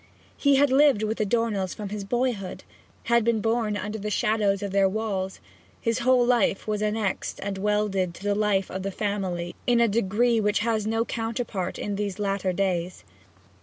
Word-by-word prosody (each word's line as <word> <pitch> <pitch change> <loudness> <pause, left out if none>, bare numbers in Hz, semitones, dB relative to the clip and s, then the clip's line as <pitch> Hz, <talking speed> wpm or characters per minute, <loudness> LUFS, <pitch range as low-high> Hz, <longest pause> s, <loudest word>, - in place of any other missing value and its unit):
He 280 -1 +3
had 280 0 +4
lived 270 -5 +5
with 215 +1 -2
the 215 - +1
Dornells 210 -4 0
from 210 -2 -6
his 205 0 -4
boyhood, 235 -3 -2 0.4
had 235 -1 +3
been 230 -1 +2
born 225 -1 0
under 210 +1 -4
the 210 +1 -3
shadow 210 -2 +2
of 200 0 -4
their 195 0 +3
walls; 195 -2 -3 0.4
his 230 0 0
whole 250 0 +4
life 235 -5 +2
was 210 -1 -1
annexed 210 -2 -2
and 195 -1 -3
welded 200 -3 0
to 190 - -12
the 205 0 +1
life 200 -2 +1
of 190 - -4
the 195 - -2
family 190 -4 -3
in 240 -1 +4
a 235 - +5
degree 230 +2 +2
which 210 0 +1
has 220 -2 0
no 225 +1 +1
counterpart 225 -5 -3
in 205 -1 -3
these 200 -2 -3
latter 195 -2 -1
days. 180 -2 -2
210 Hz, 185 wpm, -26 LUFS, 195-230 Hz, 0.4 s, lived